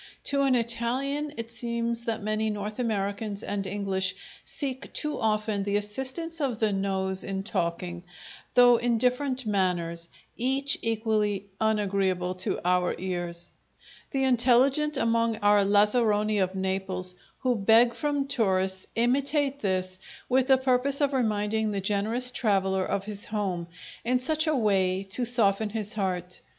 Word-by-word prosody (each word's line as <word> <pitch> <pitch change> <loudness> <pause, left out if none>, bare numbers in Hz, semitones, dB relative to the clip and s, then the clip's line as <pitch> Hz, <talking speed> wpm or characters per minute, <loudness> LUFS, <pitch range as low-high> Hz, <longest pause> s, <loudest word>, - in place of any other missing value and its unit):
To 280 -1 +1
an 270 -2 +3
Italian 250 +5 -1
it 230 0 -6
seems 235 0 -2
that 225 -2 -2
many 215 +1 0
North 210 +2 -5
Americans 205 -2 -2
and 200 -1 -3
English 190 -1 0 0.3
seek 265 -2 -3
too 300 -1 -2
often 215 -1 0
the 200 +1 0
assistance 265 +11 -2
of 260 -6 -1
the 215 -2 +1
nose 190 -1 0
in 195 0 -4
talking, 175 -3 -3 0.5
though 245 -1 +7
in 235 0 +1
different 255 +2 0
manners, 175 -4 -1 0.3
each 270 +3 +1
equally 215 -3 0
unagreeable 195 -4 0
to 185 0 -1
our 180 0 +2
ears. 175 -2 -4 0.6
The 270 -2 -1
intelligent 265 +4 +3
among 230 -1 +1
our 205 -1 +4
lazzaroni 210 +1 +3
of 185 0 0
Naples, 190 -1 -2 0.3
who 255 -1 +2
beg 225 +3 +4
from 290 -2 -1
tourists, 190 -7 0
imitate 275 +4 +1
this, 185 -3 -1 0.3
with 260 0 +2
the 265 -1 +6
purpose 260 +1 +1
of 285 -1 +1
reminding 220 -3 0
the 200 -1 -2
generous 215 +6 0
traveller 190 -5 +1
of 195 - -2
his 205 0 -4
home, 190 -5 -3 0.4
in 250 +2 +1
such 315 +5 0
a 310 - +2
way 195 -5 +1
to 245 +5 +3
soften 220 -3 +2
his 215 0 -3
heart. 180 -3 -3
215 Hz, 140 wpm, -27 LUFS, 195-250 Hz, 0.6 s, though